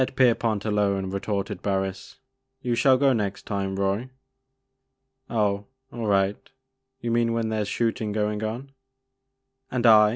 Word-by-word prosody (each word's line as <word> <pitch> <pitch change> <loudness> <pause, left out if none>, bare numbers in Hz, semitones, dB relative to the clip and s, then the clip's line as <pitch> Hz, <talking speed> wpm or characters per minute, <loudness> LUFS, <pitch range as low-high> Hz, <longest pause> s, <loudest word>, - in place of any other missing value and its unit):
1 130 - +3
5 - - -10
"I>t 130 0 +3
Kerpont 115 -4 +2
alone," 100 -3 +1
retorted 100 0 -3
Barris, 95 -1 -2 0.5
"you 125 -2 0
shall 130 +2 +5
go 135 0 +4
next 105 -4 -2
time, 100 -1 -2
Roy." 100 +6 -1 0.6
" 130 0 -50
Oh, 105 -3 0 0.3
all 115 -2 -3
right, 100 0 +2 0.4
— 130 -1 -48
^youmean 115 0 +1
when 115 -1 0
there 110 -1 0
's 105 - -2
shoot 115 +1 0
ing 105 -1 -2
going 105 0 -1
on?'* 120 +6 -4 1.0
And 125 -1 -1
I 105 -2 +8
110 Hz, 165 wpm, -25 LUFS, 100-125 Hz, 1.0 s, I